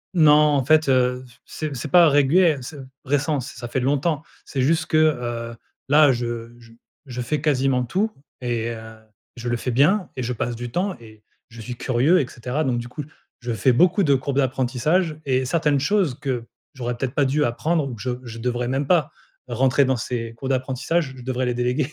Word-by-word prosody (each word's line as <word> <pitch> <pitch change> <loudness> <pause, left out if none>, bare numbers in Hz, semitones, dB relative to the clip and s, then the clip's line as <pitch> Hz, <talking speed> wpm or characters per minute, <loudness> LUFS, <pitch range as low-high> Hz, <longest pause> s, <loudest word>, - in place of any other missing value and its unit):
Non 155 -4 +6 0.2
en 135 - +1
fait, 155 +1 +3
heu, 125 0 +2
f 120 - -22
c'est 155 -3 -5
c'est 120 - -4
pas 175 -2 +7
régulier, 150 +3 +4
c'est 145 +5 -8 0.3
récent. 145 +1 0
Ç 125 - -7
ça 120 0 -6
fait 125 - -2
longtemps 145 +4 0 0.2
c'est 135 - -3
juste 160 +4 +2
que, 155 - +1
heu, 120 -6 0 0.3
là 150 -1 +6
je 120 -1 -4
j 115 -1 -18 0.3
je 125 -1 -5
fais 140 +4 -2
quasiment 135 -4 +1
tout 195 - -1 0.3
et 120 -2 -2
heu, 110 -1 -8 0.4
je 120 0 -5
le 120 - 0
fais 125 - -3
bien 160 - +3
et 130 - -4
je 120 - -2
passe 120 +1 -3
du 120 +1 -6
temps 185 +6 -1
et 110 -2 -16 0.3
je 115 0 -11
suis 120 +3 -6
curieux 130 +9 +2
et 130 - -3
cetera. 130 +5 -3
Donc 125 -4 0
du 120 0 -5
coup, 150 - -6 0.4
je 120 -2 -3
fais 115 +4 +3
beaucoup 180 +8 +4
de 145 -5 +4
courbes 135 +1 -2
d'apprentissage 140 +5 +1
et 130 -1 +1
certaines 150 0 +1
choses 180 0 +1
que 130 -5 -3 0.3
j'aurais 120 -1 -3
peut-être 125 +1 -4
pas 145 - +3
dû 145 +3 +1
apprendre 150 +5 0
ou 120 - -6
que 105 - -11
je 125 - -2
je 115 -1 -8
devrais 120 +1 -2
même 135 +3 -1
pas 170 -6 +2 0.4
rentrer 130 +3 +2
dans 130 -1 +1
ces 115 -1 -4
cours 130 +3 -6
d'apprentissage, 130 +3 -1
je 125 - -10
devrais 130 0 -2
les 125 - 0
déléguer. 125 +4 -1
130 Hz, 210 wpm, -22 LUFS, 120-150 Hz, 0.4 s, pas